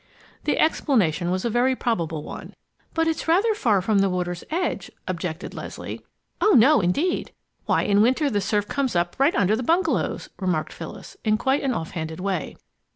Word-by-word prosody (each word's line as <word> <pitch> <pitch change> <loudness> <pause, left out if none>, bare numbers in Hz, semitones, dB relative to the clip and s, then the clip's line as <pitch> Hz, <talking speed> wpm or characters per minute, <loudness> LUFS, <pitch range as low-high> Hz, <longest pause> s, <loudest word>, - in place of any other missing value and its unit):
The - - +1
explanation 195 - +2
was 185 +3 -1
a - - +1
very 250 +3 +2
probable 165 -12 -2
one. - - -9 0.4
"But 325 0 +2
it's 325 0 -1
rather 390 +7 +3
far 215 - +2
from 205 0 +2
the 195 0 +3
water's 180 -1 -2
edge," 350 +4 -2 0.2
objected 180 -1 -4
Leslie. - - -7 0.4
"Oh, 425 - +5
no, 255 +2 +6
indeed! 285 - 0 0.4
Why - - +2
in 205 0 +3
winter 260 +7 +3
the 205 -7 0
surf 205 +1 0
often - - -7
comes 265 -7 0
up 175 0 0
right 275 +5 +4
under 200 +2 +3
the 235 - -3
bungalows!" 335 +8 0
remarked 180 -5 -1
Phyllis, - - -9
in 215 -2 +2
quite 265 +5 +1
an 265 -3 0
offhanded 160 -1 -4
way. 185 -4 -2
215 Hz, 180 wpm, -24 LUFS, 180-275 Hz, 0.4 s, no